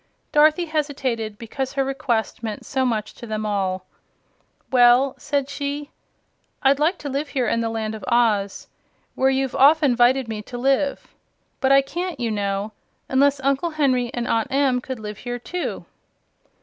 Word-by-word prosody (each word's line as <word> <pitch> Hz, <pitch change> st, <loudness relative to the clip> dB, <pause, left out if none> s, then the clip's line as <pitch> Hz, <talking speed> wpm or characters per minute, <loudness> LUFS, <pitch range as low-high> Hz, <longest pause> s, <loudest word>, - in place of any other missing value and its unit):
Dorothy 310 Hz, +3 st, +4 dB
hesitated, 270 Hz, -9 st, -2 dB
because 255 Hz, +4 st, -4 dB
her 275 Hz, -1 st, 0 dB
request 245 Hz, -6 st, -2 dB
meant 220 Hz, -3 st, -5 dB
so 265 Hz, -1 st, 0 dB
much 215 Hz, -3 st, -2 dB
to 235 Hz, -, -10 dB
them 215 Hz, 0 st, -3 dB
all. 190 Hz, -3 st, -1 dB, 0.9 s
"Well," 250 Hz, +1 st, +5 dB
said 285 Hz, -2 st, -1 dB
she, 285 Hz, +1 st, -4 dB, 0.7 s
"I'd 270 Hz, +1 st, +4 dB
like 330 Hz, +5 st, +2 dB
to -, -, -1 dB
live 280 Hz, +2 st, -2 dB
here 255 Hz, -4 st, -1 dB
in 230 Hz, -, +1 dB
the 230 Hz, -, -1 dB
Land 220 Hz, -1 st, -3 dB
of 220 Hz, -, -8 dB
Oz, 220 Hz, -5 st, +1 dB, 0.5 s
where 265 Hz, -, +2 dB
you've 270 Hz, -1 st, 0 dB
often 285 Hz, -1 st, +5 dB
'vited 245 Hz, +1 st, +3 dB
me 220 Hz, -1 st, -4 dB
to 245 Hz, +3 st, -8 dB
live. 275 Hz, +2 st, 0 dB, 0.5 s
But 265 Hz, -1 st, +2 dB
I 275 Hz, 0 st, +6 dB
can't, 350 Hz, +6 st, -4 dB
you 235 Hz, -2 st, -1 dB
know, 200 Hz, 0 st, -2 dB, 0.4 s
unless 275 Hz, +1 st, +3 dB
Uncle 275 Hz, +5 st, +1 dB
Henry 265 Hz, -6 st, +1 dB
and 240 Hz, -1 st, -3 dB
Aunt 230 Hz, +4 st, 0 dB
Em 265 Hz, -2 st, +2 dB
could 260 Hz, 0 st, -5 dB
live 210 Hz, -1 st, -7 dB
here 245 Hz, 0 st, -4 dB
too." 350 Hz, +9 st, -5 dB
260 Hz, 165 wpm, -22 LUFS, 225-280 Hz, 0.9 s, I